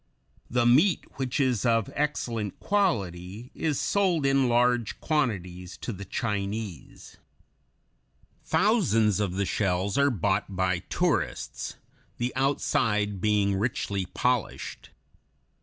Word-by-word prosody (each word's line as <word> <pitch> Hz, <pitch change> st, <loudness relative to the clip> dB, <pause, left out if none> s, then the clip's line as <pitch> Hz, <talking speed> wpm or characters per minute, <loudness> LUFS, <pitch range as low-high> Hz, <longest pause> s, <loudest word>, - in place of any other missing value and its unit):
The 120 Hz, 0 st, +2 dB
meat, 150 Hz, +10 st, +4 dB
which 130 Hz, 0 st, -1 dB
is 130 Hz, -6 st, +1 dB
of 115 Hz, -3 st, +2 dB
excellent 120 Hz, -8 st, -2 dB
quality, 105 Hz, -, -1 dB
is 155 Hz, -4 st, -1 dB
sold 185 Hz, -7 st, +1 dB
in 135 Hz, -2 st, +3 dB
large 120 Hz, -1 st, +2 dB
quantities 95 Hz, -, -2 dB
to 120 Hz, -, -5 dB
the 100 Hz, +1 st, -8 dB
Chinese. 100 Hz, -, -4 dB, 1.3 s
Thousands 120 Hz, -, +2 dB
of 100 Hz, -4 st, 0 dB
the 100 Hz, +1 st, 0 dB
shells 95 Hz, +3 st, 0 dB
are 140 Hz, 0 st, +5 dB
bought 100 Hz, -3 st, -1 dB
by 90 Hz, -1 st, +1 dB
tourists, -, -, -2 dB, 0.4 s
the 120 Hz, +1 st, -2 dB
outside 105 Hz, -7 st, +1 dB
being 105 Hz, -2 st, +2 dB
richly 100 Hz, -4 st, -1 dB
polished. 125 Hz, +2 st, -2 dB
115 Hz, 110 wpm, -27 LUFS, 100-135 Hz, 1.3 s, are